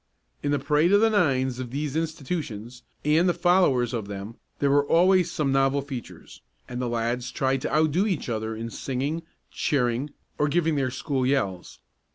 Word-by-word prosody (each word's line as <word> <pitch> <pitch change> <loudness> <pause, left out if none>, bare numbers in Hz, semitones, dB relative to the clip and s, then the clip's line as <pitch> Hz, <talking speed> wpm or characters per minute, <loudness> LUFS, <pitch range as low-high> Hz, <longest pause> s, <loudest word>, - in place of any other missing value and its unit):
In 145 - -1
the 145 - +2
parade 150 +5 +2
of 205 - +7
the 225 0 +4
nines 130 - +1
of 125 -2 -5
these 145 +2 -3
institutions, 140 -7 -4 0.2
and 160 +4 +4
the 175 - +1
followers 160 -10 +3
of 110 -4 -3
them, 100 +2 -6 0.2
there 140 -1 +1
were 145 0 +4
always 180 +1 +4
some 145 -3 0
novel 135 +1 +2
features, 135 -4 -9 0.3
and 125 0 -5
the 125 - -1
lads 120 +1 -1
tried 135 0 0
to - - -3
outdo 155 +6 +2
each 185 -8 -2
other 110 -1 -3
in 115 +1 -5
singing, 140 +7 -3 0.3
cheering 125 0 0 0.3
or 150 - +3
giving 165 +1 +1
their 135 -3 0
school 130 +1 -2
yells. 100 -10 -1
140 Hz, 180 wpm, -25 LUFS, 125-155 Hz, 0.3 s, of